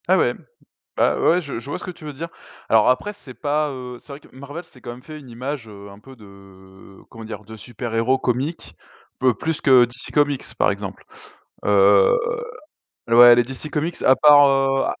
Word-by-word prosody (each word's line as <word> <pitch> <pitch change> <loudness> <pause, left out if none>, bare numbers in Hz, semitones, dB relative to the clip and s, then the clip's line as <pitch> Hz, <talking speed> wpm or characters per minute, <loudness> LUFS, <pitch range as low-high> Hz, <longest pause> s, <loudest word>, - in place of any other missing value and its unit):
Ah - - +4
ouais? - - +2 0.6
Bah - - +1
ouais 175 +2 +3
je 140 -8 -6
je 135 - -10
vois - - -4
ce - - -11
que - - -5
tu 165 - -16
veux 150 - -6
dire. 160 +5 -7 0.4
Alors 110 -1 +4
après 165 +11 -1
c'est 145 -11 -14
pas, 150 +1 -1
heu, 125 -2 -8
c'est - - -26
vrai 140 - -8
que - - -21
Marvel 145 +6 -9
s'est 130 - -20
quand 120 - -8
même 120 +1 -11
fait 155 +2 -11
une 135 -4 -14
image, 125 +1 -6
heu, 100 -1 -12
un 100 +1 -15
peu 130 +4 -15
de 95 -2 -17
comment 115 -1 -11
dire? 110 -1 -8
De 110 +2 -11
super 120 +1 -7
héros 120 +4 +1
comique, 130 +8 -3 0.6
plus 160 -1 -3
que 130 -3 +5
DC 120 +1 -7
comics 145 -2 +1 0.2
par - - +3
exemple. 100 -1 -8 0.6
Heu, 100 -1 +4 0.9
ouais 120 +1 +8
les 120 - +4
DC 130 +5 -8
comics 160 +3 -3
à 130 - +5
part, 145 -1 +6
heu 135 0 +1
125 Hz, 205 wpm, -21 LUFS, 110-145 Hz, 0.9 s, ouais